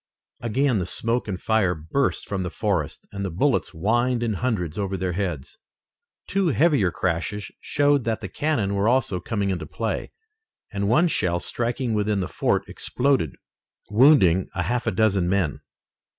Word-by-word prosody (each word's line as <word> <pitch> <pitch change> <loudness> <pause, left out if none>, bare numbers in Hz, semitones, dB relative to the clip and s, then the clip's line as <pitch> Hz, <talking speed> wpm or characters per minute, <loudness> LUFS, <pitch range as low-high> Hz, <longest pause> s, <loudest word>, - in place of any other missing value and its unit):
Again 120 0 +1
the 90 - -2
smoke 115 +5 -1
and 95 -3 -3
fire 105 -5 +1
burst 80 - -1
from 100 -2 -2
the 90 - -2
forest, 95 -6 -2
and 100 0 -5
the 95 - -2
bullets 130 - +1
whined 120 +7 0
in 115 -2 0
hundreds 100 -6 -2
over 100 -1 -2
their 95 -1 -1
heads. 85 -7 -4 0.7
Two 195 -2 0
heavier 145 - +3
crashes 90 +5 -2
showed 145 -2 +2
that 115 -1 0
the - - -5
cannon 120 -10 -1
were 100 +1 +1
also 120 -7 +1
coming 100 +1 -1
into 85 -5 -4
play, 110 +1 -3 0.6
and 100 0 -1
one 155 +10 +4
shell 90 - +1
striking 120 +4 -2
within 105 -1 +1
the 95 - -2
fort, - - 0
exploded, 130 - 0 0.6
wounding 105 - +5
a 90 - 0
half 120 +7 -1
dozen 100 -5 +2
men. 90 -7 0
105 Hz, 160 wpm, -24 LUFS, 90-120 Hz, 0.7 s, wounding